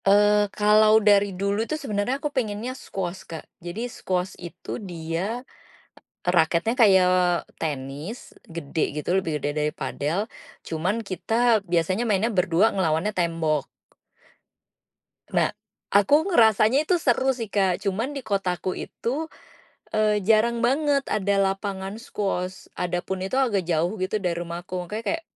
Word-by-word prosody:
Eee, 205 +1 +5
kalau 215 +1 +6
dari 205 -2 +4
dulu 200 +2 0
tu 310 - -1
sebenernya 250 -2 -1
aku 290 +1 -4
pengennya 230 -1 -2
squash 190 -7 -5
Kak. 160 -2 -7 0.2
Jadi 175 +7 -4
squash 185 -6 -3
itu 175 +6 -7
dia 180 +6 -4 0.8
raketnya 175 +5 +2
kayak 185 -6 +4
tenis 145 - -5 0.2
gede 160 -2 -5 0.2
gitu, 150 +4 -1
lebih 185 -4 0
gede 145 - -2
dari 150 0 +1
padel, 170 +9 -2 0.4
cuman 180 +7 -1
kita 225 +3 +1
biasanya 180 +4 0
mainnya 215 +2 +1
berdua 185 +1 +3
ngelawannya 175 +1 +1
tembok. 165 -4 0 1.7
Nah, - - +1 0.4
aku 205 +7 +5 0.2
ngerasanya 220 +2 +5
itu 365 - +3
seru 265 -4 +2
sih 225 -4 -5
Kak, 190 -3 +1
cuman 205 +6 0
di 265 - -7
kotaku 185 -2 -1
itu, 295 +7 -4 0.6
eee, 215 -1 +3
jarang 230 +2 +3
banget 280 +2 +2
ada 200 -1 0
lapangan 195 0 -1
squash, 190 -5 -3
adapun 180 +1 -3
itu 195 +7 -2
agak 235 -8 +2
jauh 170 +3 +1
gitu 190 +3 0
dari 180 -4 -1
rumahku. 175 +1 -7
Makanya 215 +4 -5
kayak, 325 0 -2
195 Hz, 130 wpm, -25 LUFS, 175-225 Hz, 1.7 s, kalau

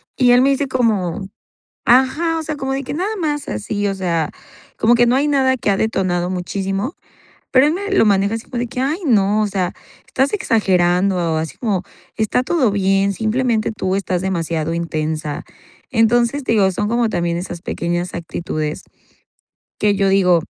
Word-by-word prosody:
y 250 -2 +4
él 245 +1 +6
me 275 - +4
dice 275 +1 +1
como: 215 -9 0 0.6
"Ajá", 275 +7 +3
o - - -4
sea, 310 0 -3
como 270 -2 -3
de 275 +1 -2
que - - -5
nada 385 +8 -2
más 295 -5 -2
así, 205 - -2
o 195 - -1
sea, 170 -4 -1 0.5
como 230 +2 +4
que 240 - +4
no 245 - +3
hay 280 +3 +2
nada 265 -2 +2
que 225 - -1
ha 195 - +2
detonado 185 -5 0
muchísimo, 195 - -3 0.6
pero 265 +2 +5
él 305 - +1
me 405 +2 -4
lo 385 - +4
maneja 200 +1 +2
así 225 - -6
como 250 - -5
de 245 - -1
que, 250 - -6
"Ay 295 +7 0
no, 210 -4 +3
o 210 - +1
sea, 185 -3 -2 0.3
estás 270 +5 0
exagerando", 190 - +2 0.2
o - - 0
así 160 0 -4
como: 200 -6 -1 0.3
"Está 220 +3 +1
todo 260 -6 +1
bien, 195 0 +2
simplemente 225 +1 0
tú 190 -3 -2
estás 185 -2 -1
demasiado 165 -3 -2
intensa", 155 -2 -3 0.5
entonces, 240 +3 +2
digo, 200 -4 +3
son 210 +3 -2
como 235 0 +2
también 170 -2 -1
esas 175 -1 -6
pequeñas 175 +1 -3
actitudes, 160 -2 -4 1.0
que 210 -1 +2
yo 195 0 +2
digo, 180 -3 +4
205 Hz, 180 wpm, -19 LUFS, 180-255 Hz, 1.0 s, él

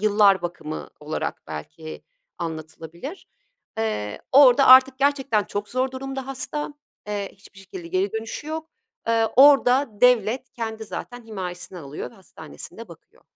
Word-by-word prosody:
yıllar 205 -3 +4
bakımı 170 -3 -5
olarak 150 +1 -4
belki 155 - -8 0.4
anlatılabilir. 165 - -7 0.5
Eee, 105 - -2
orada 270 0 +7
artık 260 0 +8
gerçekten 275 -6 +2
çok 205 0 -4
zor 255 +2 0
durumda 270 0 -5
hasta, 290 +2 -5 0.3
eee, 205 -1 -3
hiçbir 200 0 -18
şekilde 190 -2 -9
geri 185 +3 0
dönüşü 225 +6 -5
yok. 315 +1 -5 0.4
Eee, 225 -1 +3
orada 275 0 +6
devlet 250 0 +3
kendi 225 -2 -5
zaten 245 +3 -7
himayesine 185 -4 -6
alıyor 145 -2 -7
ve - - -19
hastanesinde 125 - -11
bakıyor - - -17
220 Hz, 130 wpm, -24 LUFS, 185-260 Hz, 0.5 s, artık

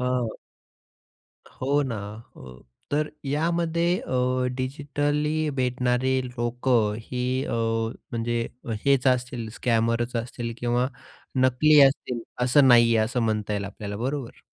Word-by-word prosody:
हं. 125 -2 0 1.3
हो 140 +3 +2
ना, 130 -5 -3 0.4
हो. 65 -1 -13 0.3
तर 150 +1 +1 0.2
यामध्ये 170 +4 +1
अ, 125 0 0
डिजिटली 145 +3 -1
भेटणारे 125 +1 +1
लोकं 120 -2 0
ही 125 +3 -2
अ, - - -3 0.6
म्हणजे 115 0 -1 0.4
हेच 140 -2 +3
असतील 125 -2 0
स्कॅमर 115 0 +1 0.2
असतील 120 0 -5
किंवा 120 +1 +1 0.5
नकली 130 +4 +5
असतील, 135 -3 +3 0.2
असं 130 +2 +5
नाहीये, 120 -1 +6
असं 115 +3 0
म्हणता 110 -2 -1
येईल 100 -1 -2
आपल्याला 100 +1 -6
बरोबर? 130 +2 -4
125 Hz, 110 wpm, -25 LUFS, 120-140 Hz, 1.3 s, नाहीये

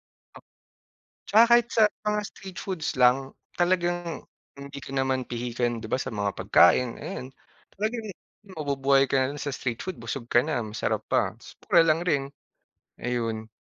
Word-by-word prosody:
o - - -18 0.9
'Tsaka 220 +2 +7
kahit 235 -1 +3
sa 225 - +5 0.2
mga 210 0 +1
street 190 -2 -10
foods 180 -6 -3
lang, 130 +2 +3 0.3
talagang 175 -1 0 0.3
hindi 140 0 -9
ka 135 - -10
naman 130 -1 0
pihikan 120 -1 -2
'di 110 - -5
ba - - +2
sa 130 -2 -4
mga 100 -1 -1
pagkain 100 +5 +4
ayun, 130 - -5 0.5
talagang 220 +2 -2 0.5
mabubuhay 140 -2 +2
ka 135 - +3
na 130 - +2
lang - - -8
sa 145 - -3
street 125 -3 -4
food 185 -9 -6
busog 115 +2 -5
ka - - +6
na 150 -6 -1
masarap 110 0 -2
pa - - +1
ta's - - -14 0.2
mura 165 - +6
lang 160 0 +3
rin, 145 -5 +2 0.8
ayun. 115 -3 -2
135 Hz, 165 wpm, -26 LUFS, 120-170 Hz, 0.9 s, Tsaka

